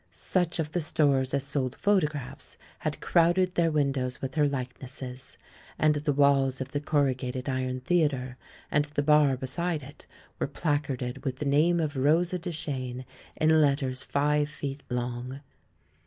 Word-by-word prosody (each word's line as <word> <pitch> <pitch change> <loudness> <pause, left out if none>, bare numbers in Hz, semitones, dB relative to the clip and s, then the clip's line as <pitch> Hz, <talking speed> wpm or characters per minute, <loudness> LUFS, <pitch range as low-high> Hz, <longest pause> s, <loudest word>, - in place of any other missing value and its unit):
Such 180 -2 -1
of 155 -2 -2
the 175 - -1
stores 140 -4 +2
as 140 -1 0
sold 135 -2 -2
photographs 155 -10 -1 0.2
had - - -3
crowded 175 +2 +3
their 170 -2 +2
windows 135 -4 0
with 135 -1 -4
her 150 -2 +3
likenesses, 130 -1 -6 0.4
and 155 -1 +4
the 150 0 0
walls 135 -2 +3
of 130 - -5
the 145 - -1
corrugated 135 -4 0
iron 130 -1 -2
theatre, 135 -5 +1 0.4
and 145 0 +3
the 145 -1 -2
bar 150 -3 +4
be 130 - -5
side 165 +3 -2
it 140 +2 -13 0.3
were - - 0
placarded 140 -6 -2
with 130 -3 -2
the 150 - -4
name 155 +5 +3
of 155 -2 -1
Rosa 165 +7 +2
Duchene 135 -7 -4 0.3
in 155 0 +4
letters 140 -3 +1
five 150 +1 +1
feet 140 -1 -5
long. 125 +2 -3
145 Hz, 155 wpm, -28 LUFS, 130-155 Hz, 0.4 s, and